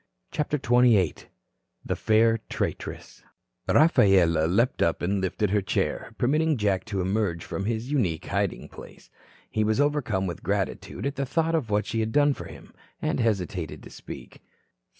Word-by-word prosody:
CHAPTER 150 0 -1
XXVIII 120 - +4 0.7
THE - - -1
FAIR 115 +1 +3
TRAITRESS - - -4 0.5
Rafaela 95 - +4
leaped 115 +9 +1
up 85 - +1
and 95 +2 0
lifted 95 +2 -1
her 105 0 +2
chair, 95 - -2
permitting 155 +4 +2
Jack 100 -3 0
to 100 -4 -2
emerge 95 -3 -1
from 95 - -4
his 115 +4 -2
unique 95 - 0
hiding - - -2
place. - - -14 0.4
He 110 - +1
was 110 +3 +1
overcome 145 -10 +1
with 85 -3 -5
gratitude - - -3
at 140 -1 -2
the 140 - -1
thought 165 +4 0
of 150 -9 0
what 105 0 +1
she 115 - -2
had 110 0 -1
done 145 +2 +4
for - - -8
him, - - -12 0.3
and - - -1
hesitated 95 - -2
to - - -12
speak. - - -10
110 Hz, 160 wpm, -26 LUFS, 95-130 Hz, 0.7 s, XXVIII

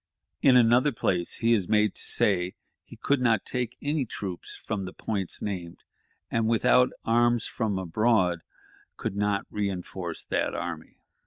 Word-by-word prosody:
In 130 -2 +6
another 125 +4 +5
place 90 -7 -1
he 115 0 +2
is 100 -6 0
made 105 -2 +3
to - - -1
say 90 -3 +1 0.3
he - - -13
could 140 -2 0
not 115 -5 +2
take 125 -1 -3
any 145 0 0
troops 95 -6 -6
from 105 -3 -4
the 95 - -7
points 100 -5 -3
named, 90 -5 -5 0.5
and, 115 -1 +1
"without 125 +2 +4 0.2
arms 120 +1 +3
from 110 -5 -2
abroad, 95 -1 +1 0.6
could - - -4
not 105 0 0
reënforce 95 -4 -4
that - - 0
army." - - -6
105 Hz, 150 wpm, -27 LUFS, 95-120 Hz, 0.6 s, In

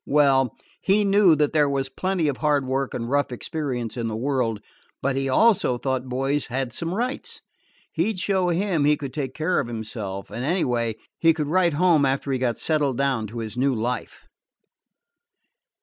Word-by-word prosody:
Well, 135 -4 +3 0.3
he 205 +2 +3
knew 195 -4 +5
that 150 -1 +1
there 150 -2 +3
was 135 -1 -1
plenty 180 +4 -1
of 140 - -1
hard 145 -3 +1
work 135 +1 -2
and 115 -1 -3
rough 145 +1 +1
experience 125 -3 -4
in 120 -2 -2
the 110 - -3
world; 120 -3 -1 0.4
but 140 0 -1
he 135 0 -1
also 195 - +3
thought 130 0 -2
boys 135 +3 -1
had 125 -1 -3
some 170 +6 -3
rights. 245 +4 -3 0.5
He 175 +6 0
'd 210 - -7
show 185 -1 +1
him 175 -3 +1
he 150 0 +4
could 140 -4 -6
take 135 -3 -4
care 160 +3 +1
of 135 - -2
himself; 110 -4 -6
and, 120 - -4
anyway, 125 - 0 0.2
he 165 -1 +4
could 150 -3 -2
write 175 -2 +3
home 165 -1 +4
after 135 +1 0
he 130 - 0
got 120 -2 0
settled 145 -5 0
down 135 -5 0
to 115 +3 -9
his 110 0 -5
new 135 0 +2
life. 120 +1 -3
140 Hz, 185 wpm, -24 LUFS, 125-160 Hz, 0.5 s, knew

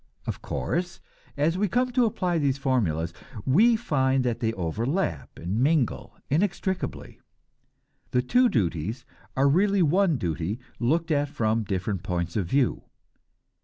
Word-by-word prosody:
Of - - -4
course, 170 - -3 0.4
as 165 +5 +1
we 210 - +2
come 250 +5 +1
to 245 -1 +3
apply 180 -5 0
these 140 -2 +1
formulas, 90 - 0 0.3
we 215 - +5
find 135 - +1
that 120 -2 -1
they 110 -1 0
overlap 100 - -2
and 90 +6 -3
mingle 140 -2 +1
inextricably; 190 +3 -2 0.9
the 125 - +1
two 245 - +4
duties 105 - -1 0.3
are 135 +1 +4
really 195 +6 +3
one 170 0 +3
duty 90 +2 -2 0.2
looked 160 +7 +1
at 145 -1 +1
from 115 -5 0
different 95 -1 -2
points 85 -1 -3
of 95 -5 0
view. 135 +5 +1
135 Hz, 135 wpm, -26 LUFS, 105-175 Hz, 0.9 s, we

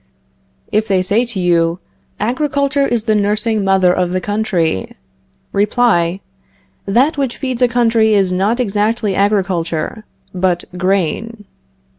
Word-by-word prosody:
If 215 +1 +1
they 190 -2 +1
say 210 +6 +1
to 230 -5 -2
you: 170 -1 +2 0.4
Agriculture 280 +3 0
is 235 -3 -1
the 220 -1 +1
nursing 210 +1 0
mother 190 -2 +3
of 180 -1 -1
the 185 - +1
country 185 - -1 0.6
Reply: 200 -4 +1 0.7
That 260 +9 +2
which 265 -3 -2
feeds 255 -3 -4
a 250 - +5
country 230 -3 +2
is 195 -2 +2
not 200 +6 0
exactly 210 -1 0
agriculture, 190 -2 -1 0.3
but 180 -1 0
grain. 195 +4 -1
205 Hz, 125 wpm, -16 LUFS, 185-230 Hz, 0.7 s, a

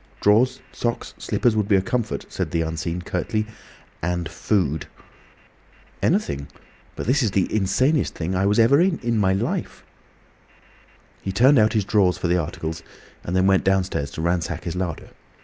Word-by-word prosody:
"Drawers, 125 +6 +3
socks, 120 -1 -3
slippers 120 -3 +1
would 105 -2 +1
be 100 - +4
a 95 - +4
comfort," 115 +1 -2
said - - -3
the 85 -1 0
Unseen, 85 +2 -3
curtly. 110 +5 -2 0.6
"And 90 0 -1
food." 80 -8 -1 1.1
"Anything. 70 0 0 0.5
But - - -5
this 135 +5 +2
is 115 - +2
the 95 -1 +1
insanest 130 +9 +1
thing 85 +2 -3
I 90 - 0
ever 100 - +2 0.3
was 175 +4 +4
in, 180 - -1
in 115 -2 +1
my 95 -2 +3
life!" 95 - -3 1.4
He 95 - -3
turned 130 +7 +5
out 110 +1 +3
his 105 -4 +1
drawers 95 -4 +2
for - - -2
the 90 +1 +2
articles, 80 +1 -5 0.4
and 90 - -3
then 95 0 +3
went 95 -1 +4
downstairs 95 -7 0
to 80 - -4
ransack 85 -1 -1
his 85 -1 -4
larder. 90 -4 -4
95 Hz, 165 wpm, -23 LUFS, 85-110 Hz, 1.4 s, turned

